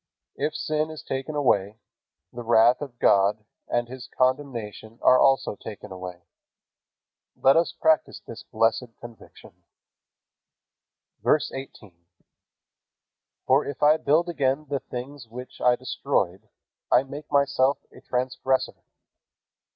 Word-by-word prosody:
If 150 +2 -2
sin 155 0 -1
is 155 -1 -9
taken 135 +3 -4
away, 105 -7 +1 0.6
the 120 - -6
wrath 120 +2 +4
of 135 -5 -7
God 105 0 +3 0.2
and 120 0 -1
His 130 +1 -9
condemnation 120 -5 -1
are 130 - +6
also 135 -5 +3
taken 105 -1 -10
away. 90 -2 -8 1.1
Let 135 - +4
us 165 +1 +2
practice 160 -1 +2
this - - -10
blessed 115 +1 -1
conviction. 120 -1 -13 1.7
VERSE 150 - +2
18. 135 -7 -9 1.5
For 135 +3 +4
if 140 - -5
I 150 +1 +6
build 160 +4 +2
again 145 -3 0
the 140 -1 -1
things 125 +1 -8
which 125 +3 -10
I 125 -1 +5
destroyed, 120 -7 -2 0.4
I 125 - +5
make 145 +3 -10
myself 140 -1 +3
a - - -15
transgressor. 130 +1 -1
130 Hz, 120 wpm, -25 LUFS, 115-145 Hz, 1.7 s, are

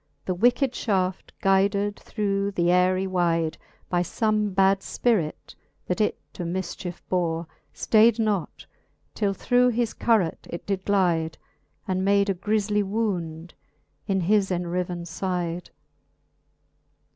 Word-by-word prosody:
The 185 - 0
wicked 245 +7 +3
Ihaft 190 -6 -1
guyded 200 +1 +2
through 200 -2 -2
th'ayrie 180 +2 +2
wyde. 170 -3 +1 0.3
By 175 -1 +1
fome 215 +3 0
bad 195 0 +4
fpirit, 195 -7 -1 0.3
that 180 +4 -1
it 210 - +1 0.2
to - - -7
mifchicfe 175 0 -4
bore, 170 -2 0 0.3
Stayd 225 +1 +4
not, 210 -6 -1 0.5
till 200 -2 0
through 250 +3 +3
his 235 -1 0
curas 215 -8 +2
it 170 - -6
did 195 -2 -2
glyde. 170 -5 +2 0.5
And 185 -1 0
made 200 0 +3
a - - +1
griefly 210 +2 0
wound 180 -6 -3 0.5
in 195 -1 +1
his 200 +2 +2
enriven 175 -1 -2
fide. 175 0 -3
190 Hz, 120 wpm, -25 LUFS, 175-205 Hz, 0.5 s, bad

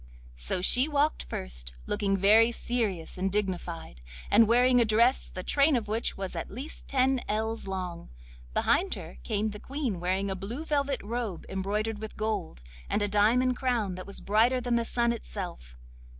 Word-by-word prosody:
So - - -1
she 255 +8 +5
walked 295 0 +1
first, - - -5
looking 200 -2 0
very 215 +4 +6
serious 215 -9 -2
and 190 +1 0
dignified, 180 - -3 0.3
and 225 0 +6
wearing 245 +2 +5
a - - +6
dress 230 +4 +3
the 185 - -7
train 285 +5 +4
of 225 -3 -1
which 220 +2 -1
was 190 -2 -5
at 165 - -4
least 265 +9 -8
ten 265 -1 +2
ells 220 +1 -2
long. 180 -3 -5 0.5
Behind - - +2
her 65 - -9
came 210 - -1
the 210 - -8
Queen 260 - -3
wearing 190 +3 0
a - - -2
blue 230 - -6
velvet 285 -3 0
robe 225 -4 -4
embroidered 205 +3 -2
with 220 0 -8
gold, 210 - -3 0.3
and 210 - +1
a - - +1
diamond 235 +5 +3
crown 240 -7 0
that 185 +1 -8
was 200 - -5
brighter 230 +5 +3
than 245 -1 -2
the 235 0 +1
sun 235 0 +1
itself. 175 - -7
215 Hz, 175 wpm, -28 LUFS, 190-245 Hz, 0.5 s, very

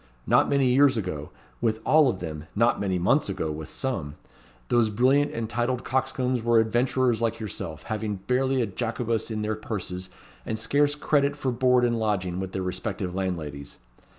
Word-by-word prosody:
Not - - +4
many 135 -3 +3
years 135 -1 +5
ago, 80 -8 -4 0.3
with 110 -2 +1
all 155 -3 +5
of 115 - -2
them; 80 -2 -5
not 115 +3 +3
many 95 -2 0
months 95 - +2
ago, 95 -5 -2
with 75 0 -6
some; 80 - -3 0.5
those 120 -2 +3
brilliant 130 +7 +3
and 115 -1 -3
titled 120 +2 -1
coxcombs 130 -1 0
were 120 0 +3
adventurers 120 +1 +1
like 115 0 0
yourself, 95 -7 -6
having 110 -2 -3
barely 125 +6 +1
a - - +1
Jacobus 115 +2 -2
in 110 -1 -3
their 110 +1 0
purses, 95 -4 -5 0.3
and 110 - -3
scarce 145 +7 +2
credit 145 -1 +1
for 130 - -1
board 125 0 +3
and 120 -1 0
lodging 95 -5 -1
with 95 -1 -4
their 95 - -3
respective 90 0 -3
landladies. 80 -7 -4
110 Hz, 175 wpm, -26 LUFS, 95-125 Hz, 0.5 s, years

